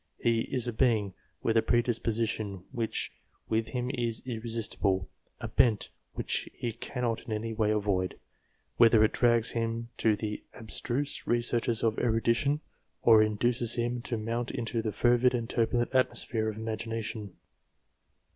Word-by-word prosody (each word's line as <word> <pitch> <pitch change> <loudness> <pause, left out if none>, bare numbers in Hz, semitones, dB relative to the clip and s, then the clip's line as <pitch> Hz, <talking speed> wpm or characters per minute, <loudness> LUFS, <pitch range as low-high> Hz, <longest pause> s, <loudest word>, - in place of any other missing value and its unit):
He 115 -1 +2
is 125 -2 -1
a 120 - -2
being 110 -5 +2 0.3
with 115 - +1
a 115 - +6
predisposition 115 -5 0
which 115 -4 -2 0.4
with 110 0 +1
him 125 +2 -2
is 120 -4 -2
irresistible 110 -5 -1 0.3
a - - -4
bent 110 -4 +2 0.2
which - - -2
he 120 -2 -3
cannot 120 0 -3
in - - -9
any 110 +1 -2
way 110 -1 +1
avoid; 100 -3 0 0.6
whether 115 -2 +7
it 110 - +3
drags 120 -2 +3
him 115 0 -2
to 110 -2 +3
the 105 0 -4
abstruse 120 +4 -1
re 120 - +3
searches 120 -1 0
of 115 -1 +1
erudition, 120 +5 +2 0.4
or 110 -2 +7
induces 115 +2 +1
him 120 0 -1
to 120 -1 -2
mount 115 +3 -2
into 115 -1 -2
the 110 -1 -2
fervid 120 +4 +3
and 115 -1 -3
turbulent 120 +2 +1
atmosphere 115 -3 +1
of 110 - -6
imagination." 110 -2 -4
115 Hz, 145 wpm, -29 LUFS, 110-120 Hz, 0.6 s, whether